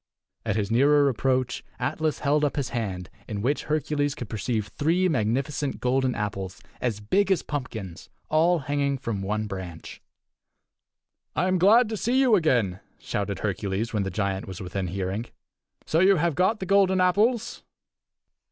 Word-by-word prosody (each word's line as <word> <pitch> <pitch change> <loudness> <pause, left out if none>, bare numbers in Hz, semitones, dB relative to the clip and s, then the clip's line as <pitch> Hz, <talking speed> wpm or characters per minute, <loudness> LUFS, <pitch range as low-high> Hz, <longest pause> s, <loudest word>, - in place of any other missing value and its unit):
At 105 - +1
his 105 -1 -1
nearer 145 +4 +5
approach 130 0 0
Atlas 155 -1 -1
held 150 +1 +2
up 145 - +1
his 135 -3 -1
hand 95 -7 -3 0.2
in 105 -2 -4
which 140 +4 0
Hercules 145 -1 0
could 120 - -7
perceive 110 -1 -2
three 170 - +1
magnificent 135 +1 -1
golden 130 0 +1
apples 100 -3 -4 0.2
as 115 -4 -1
big 195 - +1
as 185 - +2
pumpkins, 110 - -6
and - - -42
all 165 +3 +3
hanging 140 0 0
from 115 -6 -3
one 105 +2 -1
branch. 95 -5 -7 1.3
"I 180 - +1
am 185 -1 +2
glad 220 +6 +6
to 220 - -3
see 245 +6 +1
you 260 -4 +4
again," 120 - +2 0.2
shouted 100 -1 -3
Hercules 100 +2 -2
when 105 - +1
the 95 - -2
giant 95 0 -2
was 95 0 -7
within 95 0 -3
hearing. 95 +5 -3 0.6
"So 160 - +1
you 195 +2 +6
have 170 0 +1
got 190 +7 +2
the 190 - -4
golden 190 -1 +3
apples?" 220 +6 +2
130 Hz, 160 wpm, -26 LUFS, 105-165 Hz, 1.3 s, glad